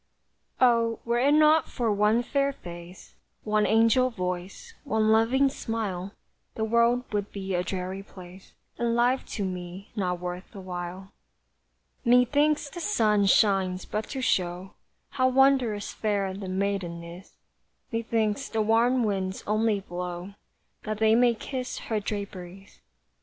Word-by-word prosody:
Oh, 230 -2 +3
were 235 0 +1
it 280 +4 +4
not 310 +1 +5
for 235 -4 -1
one 210 +3 +2
fair 280 +2 0
face, 175 -6 -11 0.3
One 215 0 +1
angel 230 +3 +4
voice, 185 - -5
one 220 -6 +1
loving 235 +5 +4
smile, 210 -7 -4 0.4
The 220 - -2
world 235 +2 +3
would 205 -1 -2
be 195 -1 -5
a 175 - +1
dreary 185 +1 -4
place, 185 -1 -14 0.3
And 235 -1 +1
life 245 +2 +2
to 200 - -2
me 180 +1 -7
not 180 -4 -1
worth 180 +3 -6
the 200 - -9
while. 185 +1 -7 0.9
Methinks 285 +5 +3
the 345 +5 -8
sun 215 - +2
shines 190 -2 +3
but 215 +1 -4
to 270 - -4
show 180 -3 -1 0.4
How 255 -2 +1
wondrous 255 -5 +2
fair 200 -3 -1
the 190 -1 -6
maiden 185 -3 -2
is; 170 +3 -11 0.6
Methinks 230 +1 -1
the 220 -1 0
warm 235 +3 +3
winds 190 -3 -2
only 215 -1 +1
blow 180 +1 -6 0.5
That 215 0 -4
they 220 0 +4
may 240 0 +4
kiss 255 +2 -5
her 220 -2 -2
draperies. 195 -2 -7
210 Hz, 140 wpm, -27 LUFS, 190-235 Hz, 0.9 s, not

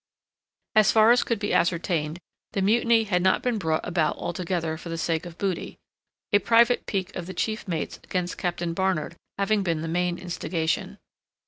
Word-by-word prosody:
As 215 -2 +5
far 220 +1 +6
as 245 - +5
could 230 - -1
be 205 0 -2
ascertained, 170 -2 +1 0.4
the 195 - 0
mutiny 230 +2 +4
had 185 -4 0
not 190 +1 +2
been 245 -3 0
brought 160 -3 -1
about 165 -3 +1
altogether 175 -2 -2
for 165 +2 -9
the 165 - -3
sake 165 +1 -1
of 165 - -11
booty; 195 -3 -3 0.6
a 205 - +7
private 235 +2 +3
pique 195 -2 -2
of 175 - -5
the 185 - -7
chief 220 -1 -2
mate's 165 -4 -3
against 180 -1 -2
Captain 175 -1 -2
Barnard 180 -3 -1 0.2
having 200 +1 +2
been 165 -4 -1
the - - -3
main 175 +1 0
instigation. 170 -2 -2
180 Hz, 180 wpm, -26 LUFS, 165-205 Hz, 0.6 s, a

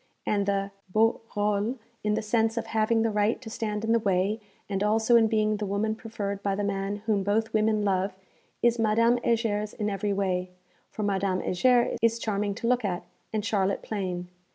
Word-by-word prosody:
And 200 -1 +1
the 200 0 0 0.2
beau 220 +5 +2
rôle, 210 +4 0 0.3
in 210 0 +1
the 220 - -2
sense 225 +1 +1
of - - -1
having 225 +1 +1
the 225 - +1
right 210 +2 +1
to 225 -4 -9
stand 215 -2 -3
in 225 - +1
the 230 - +4
way, 200 +1 +1 0.3
and 195 -1 -2
also 220 +3 +3
in 225 -1 +6
being 215 -1 +1
the 210 - -3
woman 205 +2 0
preferred 205 -3 -5
by 200 -1 0
the 205 - -2
man 200 +1 -2
whom 210 -3 +2
both 220 +3 0
women 215 -1 +2
love, 190 0 0 0.5
is 235 0 +3
Madame 230 +2 +3
Heger's 220 -3 0
in 210 -1 -1
every 200 +1 -1
way, 185 -2 0 0.4
for 215 - -5
Madame 195 -2 0
Heger 240 +6 +3
is 230 0 +3
charming 205 -3 -1
to 230 - -3
look 250 0 +2
at, 185 -3 -2 0.3
and 215 -1 -2
Charlotte 200 -3 0
plain. 180 -4 -3
210 Hz, 195 wpm, -27 LUFS, 200-225 Hz, 0.5 s, in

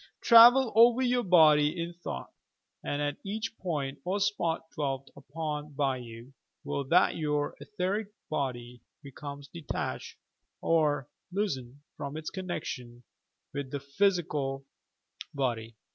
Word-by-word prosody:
Travel 240 +1 +8
over 235 +3 +6
your 250 0 +2
body 155 -4 +5
in 170 +1 -3
thought, 170 - -7 0.5
and 145 0 -2
at 145 0 -2
each 220 +3 -4
point 145 -7 -3
or 190 +3 -1
spot 190 -5 0
dwelt 140 -3 -3
upon 150 0 -5
by 135 -2 0
you. 120 +1 -10 0.3
will 140 - -2
that 175 +7 +4
your 150 -2 -1
etheric 205 +1 -2 0.2
body 125 -5 -3 0.2
becomes 140 0 -8
detached 165 -1 -5 0.4
or 150 -5 +2 0.2
loosened 145 -10 -3 0.2
from 140 +2 -5
its 155 - -5
connection 135 -10 -5 0.5
with 140 -1 -4
the 145 - -3
phyai 175 +5 +1
cal 135 -2 -3 0.7
body. 115 -4 -2
150 Hz, 125 wpm, -29 LUFS, 135-180 Hz, 0.7 s, Travel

